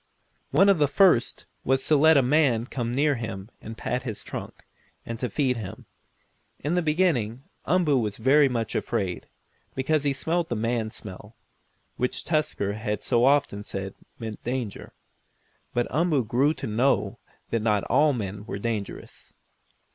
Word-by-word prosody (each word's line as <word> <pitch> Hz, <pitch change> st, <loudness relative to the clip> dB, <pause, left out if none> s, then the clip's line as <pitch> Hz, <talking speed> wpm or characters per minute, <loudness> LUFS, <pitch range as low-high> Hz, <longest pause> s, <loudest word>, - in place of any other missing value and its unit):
One 185 Hz, +8 st, +5 dB
of 195 Hz, -4 st, +5 dB
the 145 Hz, -, +4 dB
first 145 Hz, -5 st, +3 dB, 0.2 s
was 135 Hz, +1 st, +1 dB
to 155 Hz, -, +4 dB
let 160 Hz, +1 st, +6 dB
a 135 Hz, -, +5 dB
man 125 Hz, -4 st, +3 dB
come 120 Hz, -2 st, -3 dB
near 145 Hz, +4 st, +2 dB
him 110 Hz, -4 st, -6 dB
to 110 Hz, -, -7 dB
pat 125 Hz, +2 st, -2 dB
his 115 Hz, -5 st, -5 dB
trunk, -, -, -8 dB, 0.4 s
and 115 Hz, -1 st, -5 dB
to 125 Hz, -, -2 dB
feed 130 Hz, +1 st, 0 dB
him. 100 Hz, -4 st, -7 dB, 0.7 s
In 150 Hz, +4 st, -2 dB
the 180 Hz, -, +2 dB
beginning 150 Hz, -, +1 dB, 0.2 s
Umboo 155 Hz, -4 st, +3 dB
was 105 Hz, -3 st, -2 dB
very 140 Hz, +4 st, +5 dB
much 115 Hz, -3 st, -2 dB
afraid, 90 Hz, -3 st, -2 dB, 0.5 s
because 145 Hz, +3 st, +1 dB
he 145 Hz, -, +2 dB
smelled 165 Hz, +5 st, -1 dB
the 120 Hz, -, -1 dB
man 115 Hz, 0 st, -1 dB
smell, 105 Hz, +1 st, -10 dB, 0.6 s
which 125 Hz, -, -1 dB
Tusker 155 Hz, -, 0 dB
had 105 Hz, 0 st, -3 dB
so 120 Hz, +1 st, +3 dB
often 135 Hz, -7 st, +2 dB
said 95 Hz, -1 st, -5 dB, 0.2 s
meant 110 Hz, -2 st, -7 dB
danger. 120 Hz, -4 st, -4 dB, 0.8 s
But 120 Hz, 0 st, +1 dB
Umboo 155 Hz, -5 st, +2 dB
grew 135 Hz, +7 st, +2 dB
to -, -, -6 dB
know 120 Hz, +6 st, +1 dB, 0.3 s
that 115 Hz, -, +1 dB
not 105 Hz, -2 st, +2 dB
all 145 Hz, +5 st, +3 dB
men 105 Hz, -5 st, -4 dB
were -, -, -4 dB
dangerous. 105 Hz, -1 st, -5 dB
125 Hz, 160 wpm, -26 LUFS, 110-145 Hz, 0.8 s, let